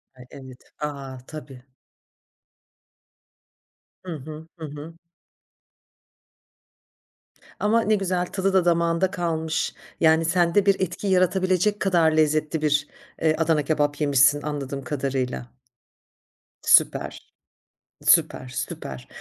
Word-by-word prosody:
Ay, 125 Hz, -1 st, -14 dB
evet. 130 Hz, -2 st, -12 dB, 0.2 s
A! 140 Hz, -3 st, -5 dB
Tabii. 140 Hz, -5 st, -10 dB, 2.4 s
Hı 175 Hz, -, -4 dB
hı. 155 Hz, +2 st, -9 dB
Hı 160 Hz, -, -6 dB
hı. 150 Hz, +2 st, -9 dB, 2.7 s
Ama 220 Hz, +2 st, +2 dB
ne 215 Hz, -1 st, +2 dB
güzel, 185 Hz, -3 st, -1 dB
tadı 190 Hz, +1 st, -1 dB
da 190 Hz, -2 st, +3 dB
damağında 170 Hz, +1 st, +2 dB
kalmış. 160 Hz, -3 st, -2 dB, 0.3 s
Yani 160 Hz, 0 st, +4 dB
sende 175 Hz, +3 st, +2 dB
bir 200 Hz, -1 st, +3 dB
etki 185 Hz, +2 st, -3 dB
yaratabilecek 185 Hz, +2 st, +2 dB
kadar 170 Hz, -5 st, +3 dB
lezzetli 155 Hz, 0 st, +1 dB
bir, 150 Hz, -1 st, +1 dB, 0.3 s
eee, 160 Hz, -1 st, +3 dB
Adana 160 Hz, -1 st, +2 dB
kebap 145 Hz, 0 st, 0 dB
yemişsin, 145 Hz, 0 st, +4 dB
anladığım 140 Hz, -2 st, -4 dB
kadarıyla. 130 Hz, -3 st, -3 dB, 1.0 s
Süper. -, -, +2 dB, 0.8 s
Süper, 130 Hz, -, +3 dB, 0.2 s
süper. 65 Hz, -2 st, -8 dB
160 Hz, 100 wpm, -24 LUFS, 145-180 Hz, 2.7 s, Yani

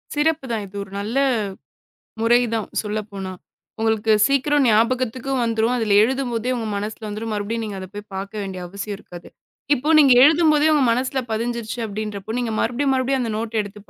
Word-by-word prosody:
சிறப்புதான், 290 Hz, -8 st, 0 dB
இது 195 Hz, -, -16 dB
ஒரு 195 Hz, -, -14 dB
நல்ல 215 Hz, +6 st, -3 dB, 1.0 s
முறைதான் 230 Hz, -2 st, +2 dB, 0.2 s
சொல்லப்போனா. 205 Hz, -3 st, -5 dB, 0.5 s
உங்களுக்கு 220 Hz, 0 st, +1 dB, 0.2 s
சீக்கிரம் 275 Hz, +1 st, +2 dB
ஞாபகத்துக்கு 240 Hz, +3 st, +1 dB
வந்துரும். 230 Hz, +1 st, +1 dB
அதுல 215 Hz, -4 st, +2 dB
எழுதும்போதே 250 Hz, -1 st, -1 dB
உங்க 225 Hz, -2 st, -3 dB
மனசுல 215 Hz, +2 st, -5 dB
வந்துரும். 215 Hz, +2 st, -5 dB
மறுபடியும் 215 Hz, +2 st, -2 dB
நீங்க 205 Hz, -2 st, -6 dB
அதப்போய் 205 Hz, +3 st, -9 dB
பாக்க 195 Hz, +2 st, -5 dB
வேண்டிய 190 Hz, -2 st, -6 dB
அவசியம் 200 Hz, +2 st, -6 dB
இருக்காது. 175 Hz, -3 st, -12 dB, 0.5 s
இப்போ 290 Hz, +4 st, -3 dB
நீங்க 275 Hz, -4 st, +7 dB
எழுதும்போதே 305 Hz, 0 st, +5 dB
உங்க 295 Hz, -3 st, +3 dB
மனசுல 255 Hz, +3 st, 0 dB
பதிஞ்சிருச்சு 235 Hz, +1 st, -3 dB
அப்படின்றப்போ, 210 Hz, 0 st, -5 dB
நீங்க 240 Hz, -2 st, -2 dB
மறுபடியும் 265 Hz, +4 st, +1 dB
மறுபடியும் 260 Hz, 0 st, 0 dB
அந்த 230 Hz, -3 st, -2 dB
நோட் 225 Hz, 0 st, -2 dB
எடுத்துப் 205 Hz, 0 st, -11 dB
225 Hz, 150 wpm, -22 LUFS, 210-255 Hz, 1.0 s, நீங்க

